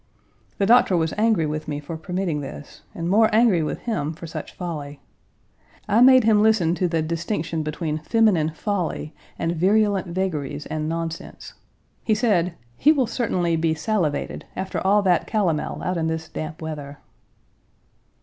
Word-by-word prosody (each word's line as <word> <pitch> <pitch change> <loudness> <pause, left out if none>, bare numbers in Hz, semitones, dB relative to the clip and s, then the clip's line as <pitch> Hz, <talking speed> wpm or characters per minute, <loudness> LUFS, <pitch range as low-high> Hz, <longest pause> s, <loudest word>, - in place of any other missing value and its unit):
The 200 - +1
doctor 225 -4 +5
was 160 -1 0
angry 215 -6 +2
with 155 +1 -4
me 145 -1 -3
for 150 +3 -7
permitting 175 -2 -2
this, 145 +1 -9
and 165 0 -3
more 215 +4 +4
angry 220 -6 +4
with 155 - -3
him 165 -10 -2
for 170 - -10
such 165 - -7
folly. 150 -5 -6 0.9
I 220 +3 +3
made 255 0 +7
him 215 -1 +4
listen 210 -7 +3
to 180 +1 0
the 165 -2 0
distinction 165 0 -2
between 155 0 -3
feminine 185 -3 +2
folly 165 -3 -3 0.2
and 165 +1 -1
virulent 200 +2 +2
vagaries 155 -6 -3
and 155 0 -3
nonsense. 165 0 -5 0.5
He 215 - +2
said: 185 -6 +1 0.2
"He 300 - +5
will 275 -5 +2
certainly 180 -9 0
be 160 0 +1
salivated 165 -3 -1
after 190 0 -3
all 200 +2 +3
that 180 -4 +2
calomel 185 -8 -1
out 180 -1 -1
in 160 -1 0
this 160 0 -3
damp 155 +1 -6
weather." 145 -2 -6
170 Hz, 160 wpm, -23 LUFS, 155-205 Hz, 0.9 s, made